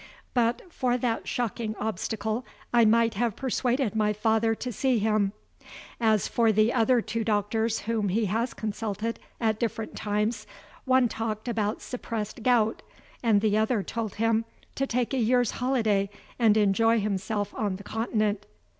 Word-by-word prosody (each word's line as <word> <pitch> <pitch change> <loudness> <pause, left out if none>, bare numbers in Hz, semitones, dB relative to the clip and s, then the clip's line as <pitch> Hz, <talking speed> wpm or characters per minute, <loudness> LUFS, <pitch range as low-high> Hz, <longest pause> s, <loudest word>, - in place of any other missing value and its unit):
But 235 -1 +1
for 250 -1 +1
that 240 -2 -1
shocking 230 -3 -2
obstacle 220 +2 -2 0.3
I 235 -1 +6
might 230 +1 +4
have 230 +1 0
persuaded 250 -2 0
my 210 -1 +2
father 225 +1 +2
to 250 +2 -5
see 255 +3 +1
him. 210 -2 +2 0.7
As 220 -3 +2
for 230 -2 +3
the 215 +2 +3
other 235 +1 +3
two 225 +1 -3
doctors 220 +1 0
whom 215 -2 -1
he 215 +4 +1
has 225 +5 -1
consulted, 220 +1 -3 0.2
at 220 -2 +1
different 225 -1 -3
times, 210 +1 -1 0.4
one 260 -1 +4
talked 220 0 -4
about 215 -2 -1
suppressed 225 -3 -5
gout, 225 -2 +2 0.4
and 220 -4 +3
the 210 -1 +2
other 220 -1 +1
told 225 -1 -4
him 225 +1 +1 0.3
to 275 - -1
take 245 +1 -1
a 265 - +1
year's 245 0 +3
holiday 220 -6 +1 0.3
and 220 -3 +5
enjoy 225 +3 +3
himself 205 0 -2
on 205 -3 -1
the 200 - -9
Continent. 215 -2 -1
220 Hz, 155 wpm, -27 LUFS, 210-235 Hz, 0.7 s, I